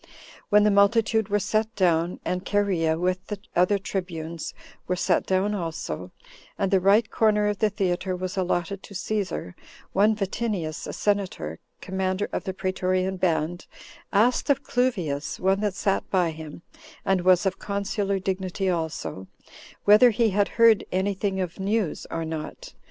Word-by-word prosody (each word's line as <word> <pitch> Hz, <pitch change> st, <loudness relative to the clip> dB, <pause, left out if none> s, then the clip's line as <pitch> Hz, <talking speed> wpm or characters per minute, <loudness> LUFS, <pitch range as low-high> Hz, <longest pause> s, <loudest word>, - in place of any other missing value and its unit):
When 210 Hz, 0 st, +6 dB
the 210 Hz, -, +4 dB
multitude 215 Hz, +1 st, +3 dB
were 205 Hz, -, +2 dB
set 220 Hz, +2 st, -1 dB
down, 170 Hz, -2 st, +1 dB
and 180 Hz, 0 st, -2 dB
Cherea, 185 Hz, -6 st, +1 dB
with 185 Hz, +2 st, -1 dB
the 210 Hz, -, -4 dB, 0.2 s
other 180 Hz, +4 st, +4 dB
tribunes, 170 Hz, -4 st, -5 dB, 0.3 s
were 180 Hz, -, 0 dB
set 180 Hz, -1 st, +1 dB
down 190 Hz, +2 st, +1 dB
also, 170 Hz, -5 st, -4 dB, 0.5 s
and 195 Hz, -2 st, 0 dB
the 195 Hz, -, +5 dB
right 200 Hz, +4 st, +4 dB
corner 210 Hz, -2 st, +3 dB
of 210 Hz, -1 st, -1 dB
the 215 Hz, -, +3 dB
theater 185 Hz, -2 st, -1 dB
was 185 Hz, 0 st, -4 dB
allotted 185 Hz, 0 st, -1 dB
to 200 Hz, -, -12 dB
Cæsar, 190 Hz, -, -3 dB, 0.4 s
one 210 Hz, +3 st, +3 dB
Vatinius, 195 Hz, -5 st, -3 dB
a -, -, -4 dB
senator, 195 Hz, -, -1 dB, 0.2 s
commander 190 Hz, +1 st, -1 dB
of -, -, -3 dB
the 190 Hz, -, -2 dB
praetorian 185 Hz, 0 st, -1 dB
band, 170 Hz, -1 st, -1 dB, 0.4 s
asked 235 Hz, +8 st, +2 dB
of 280 Hz, 0 st, +2 dB
Cluvius, 180 Hz, -, -1 dB
one 190 Hz, +1 st, +2 dB
that 205 Hz, -2 st, -1 dB
sat 195 Hz, -1 st, 0 dB
by 180 Hz, -3 st, +2 dB
him, 160 Hz, +1 st, -9 dB, 0.4 s
and 190 Hz, -1 st, +2 dB
was 185 Hz, +1 st, +4 dB
of 190 Hz, 0 st, -1 dB
consular 200 Hz, 0 st, -1 dB
dignity 190 Hz, 0 st, -1 dB
also, 160 Hz, -, -4 dB, 0.6 s
whether 210 Hz, +4 st, +8 dB
he 225 Hz, -1 st, +2 dB
had 205 Hz, +1 st, +2 dB
heard 230 Hz, -2 st, +6 dB
any 190 Hz, +2 st, +1 dB
thing 195 Hz, 0 st, -2 dB
of 180 Hz, 0 st, -4 dB
news, 200 Hz, -3 st, -1 dB
or 165 Hz, 0 st, -3 dB
not? 160 Hz, -, -6 dB
190 Hz, 155 wpm, -25 LUFS, 180-205 Hz, 0.6 s, whether